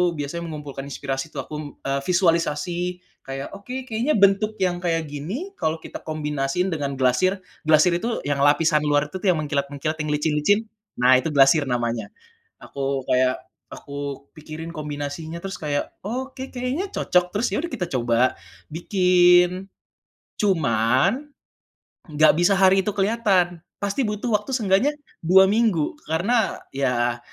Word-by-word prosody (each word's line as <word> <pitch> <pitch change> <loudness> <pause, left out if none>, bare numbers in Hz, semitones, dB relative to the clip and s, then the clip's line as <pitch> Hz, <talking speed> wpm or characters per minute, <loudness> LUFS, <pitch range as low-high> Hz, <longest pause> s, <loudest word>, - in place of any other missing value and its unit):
biasanya 150 +3 -4
mengumpulkan 145 -3 -7
inspirasi 135 0 -4
itu 140 - -5
aku, 150 - -9
m - - -5 0.2
e 135 - -4
visualisasi, 175 0 0 0.2
kayak, 135 +4 -6
"Oke, 250 +6 -7
kayaknya 240 +6 0
bentuk 200 +2 +3
yang 180 -1 0
kayak 165 -2 0
gini, 195 - -6
kalau 160 +1 -1
kita - - -9
kombinasiin 150 +2 -2
dengan 140 -3 -2
glasir" 130 +10 +2 0.3
glasir 155 +3 +5
itu 230 +7 -2
yang 145 -1 0
lapisan 150 +1 +3
luar 145 0 +2
itu 150 - -14
tuh - - 0
yang 165 - -1
mengkilat-mengkilat, 145 0 -2
yang 150 - -3
licin-licin, 150 +6 +2 0.4
nah 125 +1 +6
itu 140 +5 +1
glasir 140 +1 +5
namanya. 120 -4 -2 0.5
Aku 135 -1 -3
kayak 130 0 +3 0.4
aku 140 -1 -6
pikirin 155 +2 -8
kombinasinya, 155 +2 -6
terus 195 0 -5
kayak, 145 -2 -2
"Oke, 260 +4 -5
kayaknya 255 +9 -2
cocok," 180 0 +1
terus 225 +4 +1
yaudah 290 - -1
kita 185 -8 -2
coba 120 -1 +1 0.3
bikin, 180 +1 +3 0.7
cuman 165 - +2 0.9
enggak 155 +1 +5
bisa 175 +3 +4
hari 190 0 +5
itu 210 - 0
kelihatan, 195 -4 +1 0.2
pasti 200 +6 0
butuh 210 +2 -1
waktu 265 - -9
seenggaknya 225 +4 +2 0.3
2 190 +3 +7
minggu, 210 -7 +1
karena 200 +9 0
ya 120 -3 0
165 Hz, 140 wpm, -23 LUFS, 145-195 Hz, 0.9 s, 2